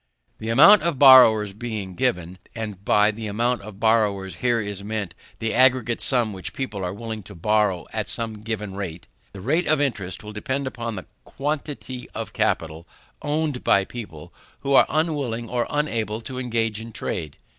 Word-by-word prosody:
The 110 - -5
amount 165 - +8
of 170 -4 -1
borrowers 120 -7 +7
being 105 -4 -5
given, 90 -6 -2 0.2
(and 105 -4 -6
by 105 +1 +4
the 110 0 -6
amount 120 +3 0
of 100 -1 -11
borrowers 100 -5 +1
is - - -18
here 105 -5 -1
meant 105 -4 -4 0.2
the 110 0 -2
aggregate 125 -2 +3
sum 120 -5 +2
which 95 -3 -7
people 105 -8 -4
are 90 - -2
willing 110 +2 -6
to 90 - -13
borrow 105 -1 +1
at - - -2
some 110 -2 -3
given 105 -3 -4
rate,) 90 -4 -6 0.3
the 100 - -10
rate 155 - 0
of 155 0 +3
interest 105 -10 -2
will 105 - -8
depend 130 +6 -3
upon 120 -3 -4
the 95 - -7 0.2
quantity 140 -3 -5
of - - -5
capital 80 +1 -1 0.3
owned 150 -3 -2
by 100 -1 +3
people 100 -11 -9 0.3
who 140 - -1
are - - +6
unwilling 145 -7 -1
or 120 +1 -1
unable 115 -8 -1
to 125 +3 -6
engage 115 -3 -1
in 115 +1 -8
trade. 80 -7 -5
110 Hz, 175 wpm, -23 LUFS, 100-125 Hz, 0.3 s, amount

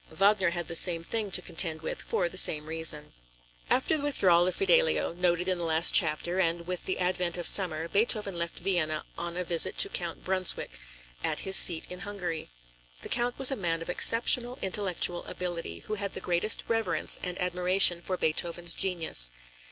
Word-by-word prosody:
Wagner 195 +2 +2
had 175 -1 -4
the 170 - -6
same 165 0 +3
thing 215 +3 -3
to - - +3
contend 160 -1 -1
with - - -5
for 180 - -1
the 170 - -10
same 150 -4 +3
reason. 155 -2 -3 0.6
After 265 +5 +2
the 305 - -2
withdrawal 185 -12 +3
of 185 - -2
Fidelio, 485 - +2
noted 175 0 0
in 185 -1 0
the - - -4
last 165 0 +3
chapter, 170 +1 +1
and 170 -1 0
with 180 0 -5
the 185 - -2
advent 180 -1 -1
of 175 - -4
summer, 165 -4 +3
Beethoven 210 0 0
left 170 0 -4
Vienna 170 -5 -1
on 170 0 -5
a 180 - -1
visit 175 +2 0
to - - +2
Count 170 -2 -4
Brunswick, 185 -1 -3 0.4
at - - -2
his 190 0 +1
seat 170 -4 +5
in 180 - -9
Hungary. 185 -5 -5 0.5
The - - -7
Count 245 0 -1
was 270 0 +2
a - - 0
man 165 -5 -2
of 170 - -5
exceptional 240 +4 +2
intellectual 185 -2 0
ability, 170 - -6
who - - -6
had 200 -1 -4
the - - -4
greatest 175 +5 +1
reverence 225 -1 +1
and 180 0 -5
admiration 180 0 +3
for 185 +1 -3
Beethoven's 170 +1 -1
genius. 165 - +1
180 Hz, 185 wpm, -28 LUFS, 170-195 Hz, 0.6 s, seat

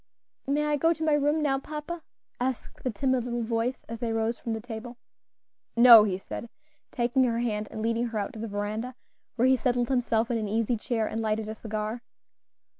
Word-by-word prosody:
"May 295 +2 +1
I 300 0 +1
go 330 +3 +3
to 320 -1 -6
my 310 -1 +3
room 295 +1 +2
now, 270 -2 +2
papa?" 305 +4 -6 0.4
asked 255 0 -3
the 255 - 0
timid 260 +2 0
little 240 -1 -2
voice 230 +3 -1
as 230 0 -6
they 230 -1 -2
rose 225 +1 0
from 230 - -3
the 225 - -3
table. 235 +1 -8 0.8
"No," 235 -2 +10
he 190 -3 -1
said, 230 +4 -7 0.4
taking 245 +2 +2
her 230 -2 0
hand 215 -3 -1
and 220 - -5
leading 230 +1 +1
her 225 -2 -4
out 205 - -2
to 220 - -8
the 225 - -4
veranda, 215 +4 -3 0.4
where 245 +1 +3
he 260 - +5
settled 245 -2 0
himself 235 -3 +1
in 230 - +1
an 215 - -2
easy 225 +3 +1
chair 225 0 -1
and 225 +1 -3
lighted 215 0 -1
a 215 - -4
cigar. 215 +1 -4
235 Hz, 205 wpm, -27 LUFS, 220-260 Hz, 0.8 s, No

